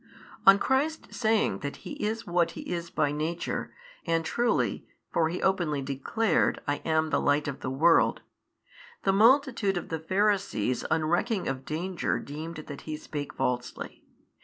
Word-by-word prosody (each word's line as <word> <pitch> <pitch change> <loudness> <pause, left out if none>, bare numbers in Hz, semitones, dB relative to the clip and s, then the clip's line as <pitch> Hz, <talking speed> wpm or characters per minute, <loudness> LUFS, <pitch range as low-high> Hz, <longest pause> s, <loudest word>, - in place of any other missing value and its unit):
On 195 0 +10
Christ 275 +8 0
saying 220 -2 +1
that 145 0 -4
He - - -6
is 220 +2 -2
what 175 -1 +1
He - - -4
is 170 -1 -4
by 145 -1 +1
Nature 160 +3 -3 0.3
and 165 -1 0
truly 240 +6 0 0.3
(for 160 -1 +2
He 175 - -4
openly 170 -7 +1
declared, 140 - +1
I 145 0 +1
am 160 -1 0
the - - +2
Light 145 +1 +2
of 140 - -4
the - - -4
world) 160 +6 +4 0.8
the 195 - +3
multitude 230 -2 +4
of 175 - -5
the 160 - -2
Pharisees 190 - 0
unrecking 175 +7 +1
of 135 0 -3
danger 175 +4 -2
deemed 155 +4 -6
that 145 - -8
He 155 -1 -5
spake 145 -2 -6
falsely. 125 0 -3
165 Hz, 155 wpm, -28 LUFS, 150-200 Hz, 0.8 s, On